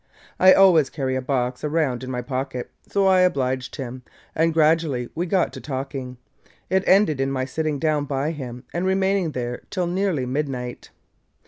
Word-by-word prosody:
I 185 0 +8
always 175 -7 +5
carry 135 -3 -2
a 130 - -1
box 125 -2 -2
around 150 -5 0
in 130 - -6
my 125 -1 -3
pocket, 130 -1 -4 0.2
so 200 -1 +1
I 190 -1 +5
obliged 130 -8 0
him, 130 -3 -6 0.3
and 165 +1 +2
gradually 155 -5 +2
we 175 +3 -2
got 185 0 +1
to - - -8
talking. 135 -2 -5 0.5
It 190 0 +3
ended 185 -8 +4
in 135 - 0
my 130 -1 -1
sitting 155 +2 -2
down 150 -1 0
by 140 +2 -1
him 125 -5 -7
and 175 - -1
remaining 190 -3 +1
there 120 -1 -4
till 185 -3 -1
nearly 175 -6 0
midnight. 130 -2 -4
145 Hz, 175 wpm, -23 LUFS, 130-170 Hz, 0.5 s, I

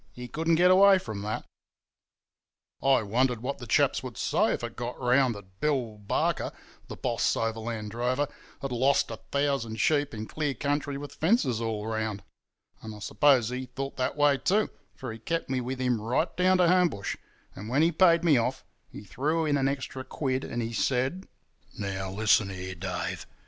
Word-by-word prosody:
He 125 0 -8
couldn't 165 +6 +1
get 180 +2 +5
away 195 +1 +7
from 110 - -6
that. 105 +2 -4 1.4
"I 135 -3 +4
wondered 120 +2 0
what 140 +2 -3
the 120 - -8
chaps - - +2
would - - -8
say - - +2
if - - -2
it 120 -1 -5
got 120 0 -5
round 125 -1 +3
that 95 -2 -14
Bill 125 -8 -1
Barker, 100 - -1 0.4
the - - -7
boss - - 0
overland 115 -1 -3
drover, 125 +5 0 0.4
had 135 - -3
lost 130 +1 +2
a 115 - -5
thousand 115 -2 -2
sheep 145 -2 +2
in 110 0 -5
clear 150 +2 -2
country 145 +2 -1
with 145 0 -8
fences 155 - +1
all 110 -2 -2
round; 110 -2 -3 0.6
and 110 -1 -8
I - - -10
suppose 125 +2 +3
he 130 +1 -4
thought 135 +2 -6
that 130 +3 -1
way 145 -2 +4
too, 210 +3 +1 0.2
for 125 -4 -6
he 115 - -10
kept 165 +4 -3
me 130 -1 0
with 130 +1 -4
him 125 -4 0
right 125 +9 0
down 185 +1 +4
to 180 -1 +4
Homebush, 175 - +2 0.4
and 105 +3 -7
when 140 +5 +3
he 165 - +4
paid 170 0 +4
me 155 -6 +5
off 125 +3 -1 0.2
he - - -10
threw 155 - -1
in 145 -2 +2
an 135 -1 +2
extra 135 -1 -3
quid, 130 0 -2
and 120 0 -3
he 115 +1 -4
said: 130 - 0 0.5
"'Now, 95 -1 -3
listen 105 +1 +3
here, 95 0 -6
Dave! 90 0 -4
130 Hz, 185 wpm, -28 LUFS, 110-145 Hz, 1.4 s, away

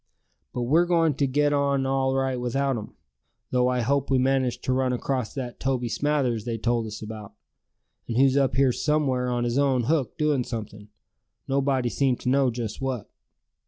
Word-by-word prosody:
But 125 - -3
we're 160 +8 +3
going 165 -3 +3
to 140 +1 0
get 145 +2 +2
on 140 -1 +1
all 135 0 +1
right 135 -1 0
without 135 +2 0
'em; 110 -3 -7 0.6
though 125 -1 +2
I 125 -1 +1
hope 140 +3 0
we 135 - +3
manage 130 -1 +1
to 130 - -1
run 130 -1 +1
across 125 -2 -2
that 125 -3 -5
Toby 125 -2 -1
Smathers 135 -6 0
they 115 0 -3
told 115 0 0
us 110 0 -7
about, 105 -2 -8 0.7
and 115 - -2
who's 135 0 +4
up 135 -4 +2
here 135 -1 +4
somewhere 135 -3 0
on 120 -1 0
his 120 +3 0
own 135 -3 +2
hook 145 0 0
doin' 150 -4 +1
something, 105 -3 -7 0.6
nobody 135 -2 +1
seemed 130 -1 +1
to - - -1
know 135 0 +3
just 115 -2 -5
what." 130 -5 -3
130 Hz, 185 wpm, -25 LUFS, 120-140 Hz, 0.7 s, who's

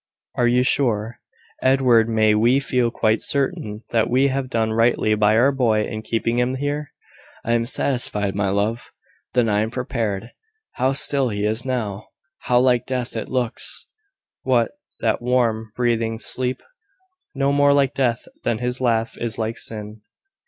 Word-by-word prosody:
"Are 120 - +1
you 125 +1 +3
sure, 120 -4 0 0.4
Edward 125 -4 +4
may 110 -1 +3
we 120 +5 +3
feel 125 -3 0
quite 110 -1 +1
certain 115 -6 -1
that 115 -1 +1
we 130 +3 +3
have 135 -1 -2
done 110 -2 0
rightly 115 -1 +2
by 105 0 +3
our 130 +4 +4
boy 115 -6 +1
in 110 - -5
keeping 115 +2 -1
him 125 +1 0
here?" 145 +2 -3 0.5
"I 115 - -1
am 115 0 +1
satisfied, 115 -7 +1
my 100 -1 0
love." 105 +4 -2 0.4
"Then 120 -2 +3
I 105 -1 +2
am 110 - -1
prepared. 115 -3 -3 0.4
How 130 +2 0
still 140 -2 +2
he 105 -1 -2
is 110 +3 -1
now! 110 -6 -3 0.3
How 120 0 +2
like 125 -2 +2
death 125 -2 -3
it - - -4
looks!" 125 -2 -1 0.6
"What, 125 -3 +1 0.3
that - - 0
warm, 115 -3 0
breathing 115 -2 0
sleep! 125 +2 -2 0.7
No 135 +1 +1
more 145 0 +4
like 140 -2 +2
death 125 -3 0 0.2
than 115 - 0
his 125 +2 -3
laugh 115 -2 0
is 115 -1 -3
like 115 0 -3
sin." 105 -1 -5
120 Hz, 160 wpm, -21 LUFS, 110-130 Hz, 0.7 s, Edward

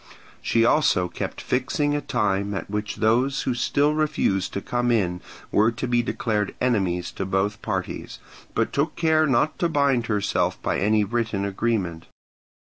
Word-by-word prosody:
She 115 0 +2
also 120 -10 +3
kept - - -5
fixing 140 +3 0
a 145 - -1
time 100 -5 0
at 95 - -5
which 105 0 -3
those 125 +5 +1
who 130 - 0
still 145 +4 +1
refused 150 -11 0
to - - -1
come 120 +2 -1
in 90 -7 +1 0.3
were 110 +3 +4
to 125 +2 -4
be 120 0 +2
declared 105 -4 -2
enemies 95 -8 0
to - - -4
both 95 +3 -1
parties, 95 -4 -4 0.4
but - - 0
took 145 +4 0
care 160 -1 +3
not 140 +3 +1
to 170 - +1
bind 140 -6 +2
herself 105 -2 0
by - - 0
any 105 +1 +3
written 110 -2 -1
agreement. 95 -5 -2
115 Hz, 160 wpm, -24 LUFS, 100-130 Hz, 0.4 s, were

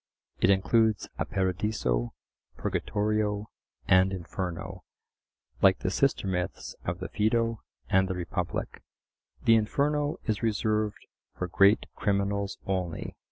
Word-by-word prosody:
It - - +4
includes 110 +2 +3
a - - +1
Paradiso, 95 - -1 0.4
Purgatorio, 105 0 -1 0.4
and 95 +1 +5
Inferno, 90 0 -5 0.8
like 95 -1 +6
the 90 - -2
sister 135 -1 +1
myths 90 -2 -3
of 85 0 -1
the 95 - -5
Phaedo 115 +1 +1 0.3
and 95 +6 +3
the 95 - -2
Republic. 90 0 -3 0.6
The 115 - +6
Inferno 145 +7 +1
is 110 -4 -1
reserved 110 -1 0 0.3
for 90 - -2
great 100 +4 +4
criminals 100 0 0
only. 90 -3 -3
100 Hz, 115 wpm, -28 LUFS, 95-110 Hz, 0.8 s, like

